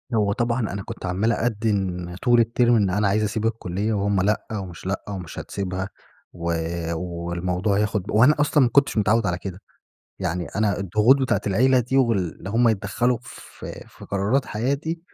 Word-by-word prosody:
هو 105 -2 +2
طبعًا 120 +3 0
أنا 100 -4 -3
كنت - - -7
عمّال 95 +5 +1
أدّن 100 -7 -1
طول 120 -1 +5
الترم، 120 +1 +3
إن 100 -4 +3
أنا 100 +3 +1
عايز 105 +2 +2
أسيب 110 +1 -1
الكلية 110 -1 -1
وهم 100 -1 +1
لأ، 105 +3 0
ومش 95 -6 -6
لأ، 95 +1 -2
ومش 90 -5 -6
هتسيبها 95 0 -4 0.4
و 85 0 -2 0.4
والموضوع 90 +3 -2
ياخد 105 -2 0
ب - - -7
وأنا 125 +8 +5
أصلًا 145 -1 +4
ما 125 - +3
كنتش 140 -1 +3
متعوّد 110 +1 +3
على 90 -1 0
كده، 95 -1 -7 0.6
يعني 90 -2 -2
أنا 105 -3 +1
الضغوط 105 +7 +4
بتاعة 130 - +1
العيلة 125 +6 +4
دي 125 +3 -1
وال 115 -6 +3 0.2
اللي 95 - -7
هم 115 +2 +3
يتدخلوا 110 +4 +1
في - - -10
في - - -14
قرارات 100 +8 0
حياتي، 140 +9 -2
105 Hz, 175 wpm, -23 LUFS, 95-115 Hz, 0.6 s, طول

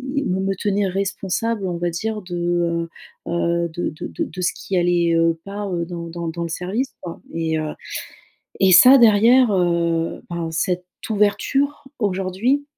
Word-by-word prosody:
me 190 -10 0
me 195 0 -1
tenir 200 0 0
responsable, 200 +2 -2
on 175 - -3
va 175 0 -1
dire, 215 +5 -3
de, 175 -1 -1 0.4
heu, - - -3
heu, 170 0 0
de 170 +2 -3
de 155 - -7
de - - -3
de 180 +2 -7
ce 175 - +1
qui 195 - -5
allait, 175 -1 +2
heu, 165 0 +2
pas, 200 0 -5
heu, 170 -1 -1
dans 170 -1 -6
dans 170 0 -5
dans 170 +1 -4
le 170 - -4
service, 195 +10 -3
quoi. 170 -2 -8
Et 160 -1 -1
heu, 155 -1 -3 0.9
et 190 -1 +5
ça, 250 +10 +9
derrière, 235 +1 +6
heu, 170 -2 0
ben, 170 -1 -3
cette 180 +2 -1 0.2
ouverture, 270 +8 +1 0.2
aujourd'hui, 200 +7 0
180 Hz, 170 wpm, -21 LUFS, 170-205 Hz, 0.9 s, ça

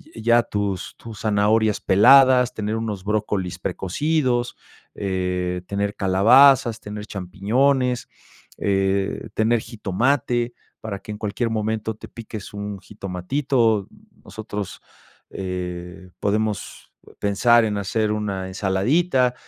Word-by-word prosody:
ya 120 +1 +3
tus 100 -4 -3
tus 115 -3 -10
zanahorias 105 0 +2
peladas, 125 +4 +6
tener 105 0 -3
unos 110 -4 -4
brócolis 105 -3 -2
precocidos, 125 - -1 0.4
eh, 90 -2 -2
tener 100 +1 -2
calabazas, 115 +5 +5
tener 105 0 -7
champiñones, 125 +8 0 0.5
eh, 95 0 0
tener 115 +1 +2
jitomate 120 +3 -1 0.3
para 100 -3 -5
que 105 - -9
en - - -7
cualquier 110 +3 -2
momento 110 0 -2
te - - -11
piques 110 -3 -9
un 100 0 -5
jitomatito. 105 +4 -1 0.4
Nosotros, 105 -2 -7 0.5
eh, 90 -1 -6
podemos 105 0 -2 0.3
pensar 115 +4 +4
en 105 -1 -1
hacer 105 +2 -1
una 100 -3 -2
ensaladita, 125 - +1
105 Hz, 105 wpm, -22 LUFS, 95-120 Hz, 0.5 s, peladas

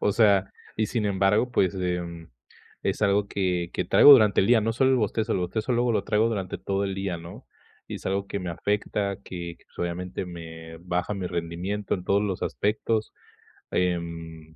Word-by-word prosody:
O 105 - +2
sea, 100 -3 +3 0.2
y 110 - +1
sin 110 -2 -1
embargo, 100 +5 +2
pues, 95 -5 +2
em, 90 -2 -3 0.5
es 95 - -1
algo 100 0 +3
que 90 -4 -1
que - - -1
traigo 145 - +9
durante 110 -6 +6
el - - +1
día, 120 -2 +6
no 115 +1 0
solo 130 +2 +3
el 130 - +4
bostezo, 110 -1 0
el - - +1
bostezo 110 +7 -2
luego 120 0 +2
lo - - 0
traigo 110 +2 +2
durante 95 -5 -3
todo 100 0 -1
el 95 -1 -2
día, 95 -2 -3
¿no? 85 +1 -11 0.4
Y - - -5
es - - -12
algo 100 +1 -1
que 100 - -3
me 90 -1 -4
afecta, 100 +2 -1
que, 85 -2 -6
pues, - - -27
obviamente, 90 +2 -3
me 80 -1 -9
baja 90 +3 -2
mi 95 -2 -3
rendimiento 90 +4 -3
en 90 - -6
todos 100 +2 +2
los 100 -3 -2
aspectos. 110 +1 -1 0.6
Em, 85 -3 -3
95 Hz, 195 wpm, -26 LUFS, 85-105 Hz, 0.6 s, traigo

